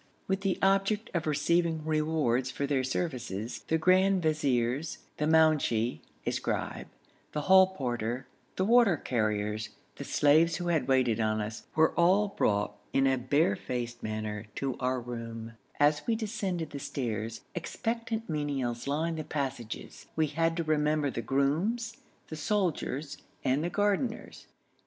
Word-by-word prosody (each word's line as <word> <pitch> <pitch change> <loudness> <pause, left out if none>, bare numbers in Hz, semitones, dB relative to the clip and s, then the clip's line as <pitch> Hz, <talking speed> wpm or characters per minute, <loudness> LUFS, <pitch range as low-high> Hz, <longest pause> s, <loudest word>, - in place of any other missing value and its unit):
With 190 0 0
the 195 -2 0
object 195 +2 +2
of 165 -3 -1
receiving 165 +1 +1
rewards 155 -5 +1
for 140 - -2
their 135 -2 +1
services, 125 - -3
the 160 - +2
grand 185 +2 +4
viziers, 140 -2 0 0.2
the 150 - 0
mounshi 155 -8 +3 0.3
(a - - +1
scribe), - - -3 0.5
the 150 - -1
hall 190 +3 +7
porter, 120 -2 -2 0.3
the 185 - +1
water 230 -5 +5
carriers, 105 -3 -1 0.3
the - - -5
slaves 160 +3 +4
who 175 0 -2
had 155 -7 +1
waited 130 -4 +3
on 110 -1 +1
us, 110 +1 -5
were 160 0 +5
all 190 +4 +4
brought 105 - 0 0.2
in 135 - +3
a 135 0 +4
bare 130 -2 +2
faced 120 +1 -4
manner 110 0 -4
to 135 -2 -2
our 130 0 0
room; 115 -1 -6 0.3
as 150 +1 +3
we 230 - +2
descended 200 -7 -3
the 140 - -5
stairs, 115 -5 -3
expectant 225 +5 -3
menials 140 -6 -2
lined 160 +3 0
the - - -2
passages; 135 -7 -5
we 160 - +3
had 165 +3 0
to 170 - 0
remember 150 -2 +1
the 115 - -3
grooms, 175 - 0 0.3
the 155 - -5
soldiers, 155 -5 -1 0.3
and 135 +3 +1
the 175 - 0
gardeners. 205 +5 -1
150 Hz, 145 wpm, -30 LUFS, 125-170 Hz, 0.5 s, hall